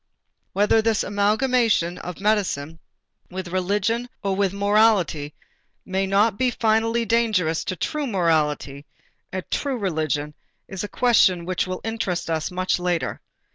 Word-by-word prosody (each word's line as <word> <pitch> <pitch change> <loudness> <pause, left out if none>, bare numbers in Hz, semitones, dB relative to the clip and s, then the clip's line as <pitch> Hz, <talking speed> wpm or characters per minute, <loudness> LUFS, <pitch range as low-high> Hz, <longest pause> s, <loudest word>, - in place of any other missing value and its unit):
Whether 210 +3 +3
this 225 -1 +1
amalgamation 210 -2 +1
of 180 -2 -7
medicine 185 -7 0 0.5
with 185 -1 -6
religion 205 +6 0
or 195 -1 0
with 195 -1 +1
morality 200 -7 +2 0.5
may 190 +1 -1
not 200 +2 +2
be 255 -1 +3
finally 225 0 +1
dangerous 215 -9 +1
to 185 - -2
true 295 - -2
morality 150 - 0 0.4
and 185 0 -4
true 275 -3 -1
religion 155 -6 -2 0.3
is 190 0 -5
a - - -3
question 195 -8 +3
which 185 0 -1
will 185 0 -4
interest 200 -7 -2
us 160 -1 -1
much 185 0 -1
later. 175 -2 -2
195 Hz, 135 wpm, -23 LUFS, 175-225 Hz, 0.5 s, Whether